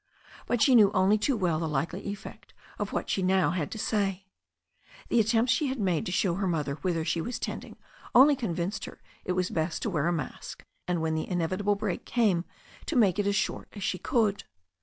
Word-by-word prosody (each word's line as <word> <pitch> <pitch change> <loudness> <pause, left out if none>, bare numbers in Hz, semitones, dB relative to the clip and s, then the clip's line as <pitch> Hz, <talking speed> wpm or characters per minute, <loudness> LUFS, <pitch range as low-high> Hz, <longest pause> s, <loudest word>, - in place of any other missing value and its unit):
But 240 -2 +2
she 265 - +5
knew 215 -5 +7
only 200 +3 +4
too 260 +3 +1
well 175 -6 +1
the 160 -1 -2
likely 160 +8 -2
effect 200 0 -9 0.2
of - - -3
what - - -2
she 195 - 0
now 185 0 +3
had 170 -5 -2
to - - -6
say. 200 -3 -1 0.8
The 235 - +3
attempts 225 +3 +3
she 295 +2 0
had 260 -1 -3
made 180 -6 0
to - - -2
show 185 -1 +1
her 195 +2 -1
mother 150 -5 -1
whither 165 -3 -1
she 165 0 0
was 245 +8 -4
tending - - -6 0.4
only 280 +4 +8
convinced 195 -4 -3
her - - -11 0.3
it 180 - 0
was 185 0 -1
best 160 +1 -2
to 220 - -1
wear 155 -2 0
a - - +2
mask, 155 -6 -5 0.2
and 175 -2 0
when 160 0 0
the 160 - -2
inevitable 185 +3 0
break 200 -3 -3
came 205 -8 +1 0.4
to 320 - -2
make 210 -5 +4
it 205 - +1
as 200 - +1
short - - -1
as 205 - -7
she 185 - -1
could. 215 -5 0
190 Hz, 215 wpm, -28 LUFS, 170-215 Hz, 0.8 s, only